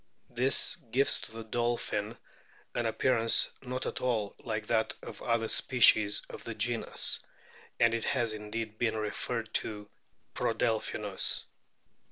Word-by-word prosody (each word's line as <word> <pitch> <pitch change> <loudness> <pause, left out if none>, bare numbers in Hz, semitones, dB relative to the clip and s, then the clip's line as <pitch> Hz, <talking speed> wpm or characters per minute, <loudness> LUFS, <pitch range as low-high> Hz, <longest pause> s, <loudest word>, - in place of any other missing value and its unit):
This 125 +3 +3
gives 135 +5 +2
to - - -8
the 115 0 -8
dolphin 115 -1 -2 0.6
an 120 -1 -1
appearance 115 0 +3
not 130 0 -4
at - - -4
all 110 -5 -1
like 110 -2 -4
that 110 +1 0
of - - -9
other 115 -1 0
species 110 -5 +5
of - - -10
the - - -6
genus, - - +2 0.6
and 115 -1 +4
it 115 - -2
has 120 -5 0
indeed 110 +1 -6
been 110 -2 0
referred 110 +1 -4
to 105 -1 -1 0.5
Prodelpkinus. 110 -1 0
115 Hz, 130 wpm, -30 LUFS, 110-120 Hz, 0.6 s, species